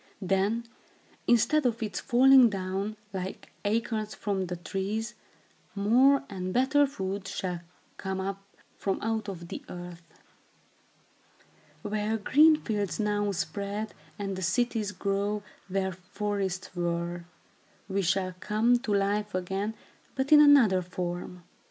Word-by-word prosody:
Then, 195 +5 +1 0.6
instead 290 +6 +4
of 235 -3 0
its 215 - -3
falling 260 -1 +6
down, 195 +2 -3 0.2
like 190 0 -6
acorns 215 0 -1
from 195 -3 -2
the 180 - -3
trees, 195 +6 -3 0.6
more 255 +8 +4
and 185 -2 -4
better 280 +5 +3
food 195 -6 -4
shall 180 -3 -3 0.4
come 190 -1 -3
up 195 +1 -3 0.4
from 195 - -1
out 220 -1 -1
of 170 -3 -7
the - - -6
earth. 175 -1 -8 1.8
Where 210 +1 -1
green 300 +9 +6
fields 205 - -2
now 205 -1 +1
spread, 200 +3 -3 0.2
and 195 -1 -3
the 190 - -5
cities 210 +3 0
grow 205 +1 -1 0.2
where 190 0 -1
forests 190 0 -4
were, 170 0 -2 0.6
we 200 0 0
shall 185 +1 0
come 225 +5 +2
to 240 -4 -4
life 205 0 0
again, 195 +4 -2 0.4
but 265 +2 -1
in 300 -1 +10
another 255 -11 +6
form. 180 0 -5
200 Hz, 125 wpm, -28 LUFS, 190-220 Hz, 1.8 s, in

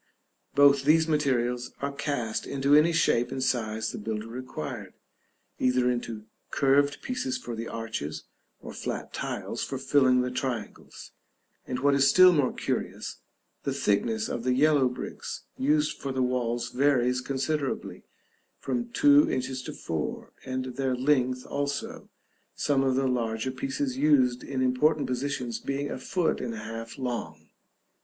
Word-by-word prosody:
Both 140 -1 +6
these 160 +3 +4
materials 125 -5 0
are 140 0 -2
cast 140 -6 -2
into 140 +1 +1
any 155 +3 +6
shape 125 -8 +2
and 135 -1 -2
size 110 -4 -1
the - - -6
builder 110 0 -4
required, 120 -9 -6 0.6
either 125 0 +3
into 115 -3 -4 0.2
curved 140 +1 +2
pieces 135 - -2
for 120 -2 -6
the 115 +1 -5
arches, 80 -10 -5 0.4
or - - -8
flat - - -5
tiles - - -4
for 135 - -3
filling 130 -1 +3
the 125 0 -2
triangles; 125 -4 -5 0.6
and, 125 - -2
what 140 +1 +4
is 140 0 +5
still 185 +5 +8
more 145 -5 +2
curious, - - -3 0.4
the - - -2
thickness 110 +2 +1
of 120 - -4
the 125 0 +2
yellow 145 -2 +4
bricks 125 - -6
used 150 +3 +1
for 135 - -3
the 130 -1 0
walls 120 -1 -1
varies 125 -2 +2
considerably, 135 +2 -2 0.6
from 240 -1 -3
two 290 +4 +5
inches 130 0 -2
to - - -6
four; 80 -2 -4
and 130 0 -3
their 135 -2 0
length 130 -1 +1
also, 140 0 -4 0.5
some 140 -2 +1
of 130 -1 +2
the 135 +1 +1
larger 115 -1 -1
pieces 135 0 -3
used 130 -4 +3
in 130 -2 -2
important 145 +4 +2
positions 125 -2 -2
being 140 +1 -3
a - - -4
foot 175 +5 0
and 120 -2 -4
a 110 - -7
half 115 +1 -7
long. 80 - -5
130 Hz, 150 wpm, -27 LUFS, 120-140 Hz, 0.6 s, still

